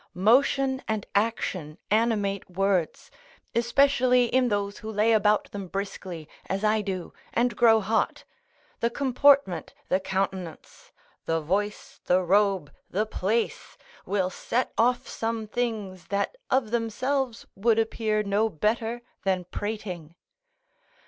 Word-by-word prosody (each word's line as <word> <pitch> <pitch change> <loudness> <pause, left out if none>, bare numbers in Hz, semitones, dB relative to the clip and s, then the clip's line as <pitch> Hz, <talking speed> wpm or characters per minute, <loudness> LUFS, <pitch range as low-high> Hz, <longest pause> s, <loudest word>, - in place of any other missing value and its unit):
Motion 265 +6 +3
and 220 -2 -1
action 190 -7 -1
animate 210 -4 +1
words, 185 -2 0 0.4
especially 250 +1 +4
in 255 +1 +2
those 205 -2 -1
who 220 - -6
lay 215 +2 +2
about 210 -1 +3
them 200 -2 -6
briskly, 185 -4 -5 0.2
as 195 +2 -2
I 215 0 +3
do, 190 -3 -4 0.2
and 240 -1 +1
grow 225 -1 +5
hot. 220 +3 0 0.6
The 235 - +1
comportment, 275 -5 +3
the 185 - +3
countenance; 190 -3 -4 0.3
the 165 0 +1
voice, 200 +6 -2
the 185 +1 +3
robe, 195 -3 +2 0.2
the 210 +4 0
place, 215 +2 -2 0.3
will 190 -2 0
set 250 +6 -2
off 245 +2 +2
some 225 -1 -3
things 215 -5 -3
that 200 - -1
of 255 -4 +1
themselves 240 +2 -1
would 225 +3 +2
appear 220 -1 0
no 210 +2 +1
better 225 +6 -1 0.2
than 185 -2 +1
prating. 180 -4 -5
215 Hz, 120 wpm, -26 LUFS, 195-235 Hz, 0.6 s, grow